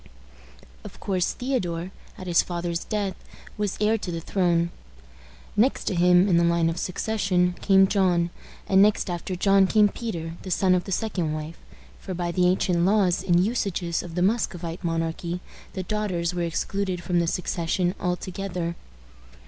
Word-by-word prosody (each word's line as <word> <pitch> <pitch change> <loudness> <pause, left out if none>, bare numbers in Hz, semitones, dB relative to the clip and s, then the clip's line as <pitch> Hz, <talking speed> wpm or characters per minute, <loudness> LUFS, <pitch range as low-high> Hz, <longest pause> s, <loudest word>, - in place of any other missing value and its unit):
Of - - -11
course, 185 -3 0
Theodore, 185 -9 -2 0.3
at 185 - -8
his 175 -2 +4
father's 175 -1 -3
death, 205 -3 -1 0.4
was 210 -2 -2
heir 215 +2 +2
to 180 - -5
the 165 - -3
throne. 170 -1 +1 0.8
Next 235 +6 +2
to - - -1
him 180 +1 +5
in 175 -4 +4
the 170 - +4
line 170 -1 +2
of 165 - -5
succession 185 -2 0
came 195 -1 +5
John; 180 -4 +2 0.4
and 190 0 +5
next 205 -2 +3
after 175 +2 -4
John 195 +1 +4
came 210 +1 +4
Peter, 170 -8 -5
the 190 - -8
son 185 +1 +3
of 180 -1 +1
the 195 - -6
second 180 -6 -1
wife; 155 +2 -6 0.4
for, 185 - -6
by 175 0 -2
the 180 0 +2
ancient 180 -1 +1
laws 190 -2 +3
and 180 -1 +3
usages 190 -7 -1
of 170 -2 -9
the 180 - +1
Muscovite 185 -5 -1
monarchy, 165 +1 -2 0.3
the 190 - -4
daughters 185 -4 -1
were 175 - -2
excluded 180 +2 -2
from 175 0 +1
the 170 - +1
succession 175 +1 -1
altogether. 180 -1 -3
180 Hz, 165 wpm, -25 LUFS, 170-195 Hz, 0.8 s, him